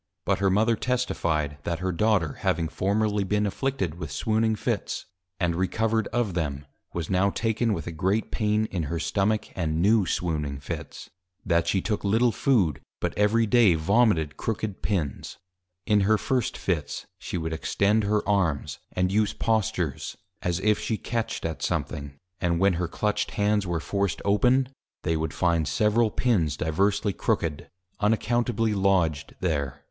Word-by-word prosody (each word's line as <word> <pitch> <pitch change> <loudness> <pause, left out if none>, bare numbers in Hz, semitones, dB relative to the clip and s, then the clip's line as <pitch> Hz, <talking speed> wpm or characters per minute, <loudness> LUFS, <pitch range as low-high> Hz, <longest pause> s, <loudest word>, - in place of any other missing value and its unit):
But - - +1
her 100 0 +3
Mother 110 +4 +3
Testifi'd, 85 - -1
that 85 - -2
her 95 +2 -2
Daughter 90 -4 +1
having 80 -1 0
formerly 105 +1 0
been 105 +2 +1
Afflicted 105 - -1
with 80 -4 -5
Swooning 110 0 +1
Fits, - - -2 0.3
and 90 -3 +1
Recovered 110 +5 0
of 120 -5 -1
them; 75 -4 -2 0.3
was 85 -3 -3
now 95 +2 +3
taken 115 +2 0
with 85 -7 -2
a 85 - -4
great 95 +7 0
Pain 105 -1 +1
in 85 -4 -1
her 85 - -1
Stomach; 105 +5 0
and 80 -3 -1
New 100 +1 +4
Swooning 75 -5 -1
Fits. 70 - -7 0.3
That 85 -1 +2
she 95 +2 +2
took 105 +1 -2
little 115 +4 +3
Food, 105 - +2 0.2
but - - -2
every 110 +3 +3
Day 110 -5 +5
Vomited 85 -3 +2
Crooked 110 -3 -3
Pins. 85 -10 -2 0.5
In 105 -1 +4
her 105 +2 +3
first 125 +1 -1
Fits, 80 -6 -2
she - - -4
would 80 -1 -3
Extend 105 +6 +1
her 105 0 0
Arms, 95 -8 0
and 90 0 +1
use 105 +1 +2
Postures, 110 - -1 0.2
as 90 0 -1
if 105 0 +3
she 110 - -1
catched 115 -5 -3
at 80 -3 -3
something, 70 -1 -3 0.2
and 85 -2 +1
when 100 0 +4
her 85 +1 -1
Clutched 105 +5 -1
Hands 105 -1 +1
were 85 -1 -1
forced 100 +2 -1
open, 125 +6 +3 0.4
they 80 - +1
would 80 -1 -1
find 85 -3 +1
several 105 +9 +2
Pins 90 - +1
diversely 100 +6 +1
Crooked, 80 -3 -1 0.3
unaccountably 115 +1 +1
lodged 90 -7 +1
there. 70 -7 -1
100 Hz, 160 wpm, -26 LUFS, 85-110 Hz, 0.5 s, Day